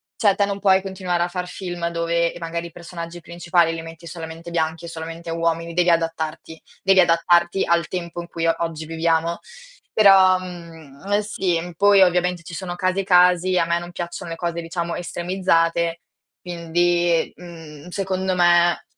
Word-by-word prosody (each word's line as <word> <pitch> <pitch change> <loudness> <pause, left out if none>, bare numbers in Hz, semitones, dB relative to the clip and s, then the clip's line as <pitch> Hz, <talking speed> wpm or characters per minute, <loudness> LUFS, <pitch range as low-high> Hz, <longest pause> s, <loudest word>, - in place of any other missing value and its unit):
cioè 205 -4 +3
te 200 - +2
non 200 0 -4
puoi 190 -1 +4
continuare 185 -3 -2
a - - -1
far 180 0 -5
film 175 -2 -4
dove 170 0 0
magari 170 0 -4
i - - -14
personaggi 170 0 -8
principali 170 0 0
li 165 - -5
metti 165 +1 -11
solamente 165 0 -8
bianchi 160 0 -2
e - - -7
solamente 165 +1 -7
uomini, 165 0 -1
devi 180 0 +2
adattarti. 165 -1 -2 0.2
Devi 190 -1 +5
adattarti 175 +1 +3
al 170 -1 +1
tempo 175 -1 -5
in 170 - -10
cui 165 0 -2
o 165 - +3
oggi 160 -2 -3
viviamo. 165 +1 0 0.5
Però, 190 -3 +6
mhmm, 165 -6 -11
uhm, 205 +1 +2
sì, 175 -4 -2
poi 200 0 +5
ovviamente 180 -1 +1
ci 170 - -10
sono 175 0 -5
casi 185 +2 0
e - - -6
casi, 180 0 +4
a - - +2
me 170 0 +1
non 175 0 -9
piacciono 170 -1 -6
le 165 - -5
cose 170 -1 -3
diciamo 170 0 -4
estremizzate, 170 -2 0 0.4
quindi, 175 0 0
mhmm, 165 -3 -12
secondo 190 0 -2
me 175 0 +3
170 Hz, 170 wpm, -22 LUFS, 165-180 Hz, 0.5 s, Però